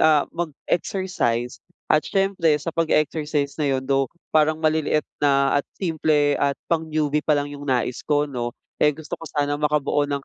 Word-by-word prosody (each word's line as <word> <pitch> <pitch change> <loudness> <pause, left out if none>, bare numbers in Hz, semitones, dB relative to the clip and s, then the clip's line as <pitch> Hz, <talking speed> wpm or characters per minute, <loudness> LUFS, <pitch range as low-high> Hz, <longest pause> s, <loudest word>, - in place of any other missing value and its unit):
ah, 155 -2 +5
mag-exercise. 165 -6 -2 0.3
At 155 - +5
siyempre 195 -6 +2
sa 160 +3 -5
pag-e-exercise 155 -2 0
na 145 - +2
'yon, 135 -1 0
though, 135 0 +1 0.2
parang 155 0 +4
maliliit 155 -1 +2 0.2
na 140 0 +3
at - - -18
simple 155 -4 +1
at 140 -1 +1 0.2
pang-newbie 155 -2 0
pa 150 0 +2
lang 145 0 -2
'yong 145 0 -8
nais 125 -1 0
ko, 150 -1 +1
'no. 120 -4 -4 0.2
Eh, 150 -1 +3
gusto 155 -1 -12
ko 165 - -8
sanang 145 0 -1
makabuo 145 -1 +1
ng 140 -1 -3
150 Hz, 165 wpm, -23 LUFS, 140-155 Hz, 0.3 s, ah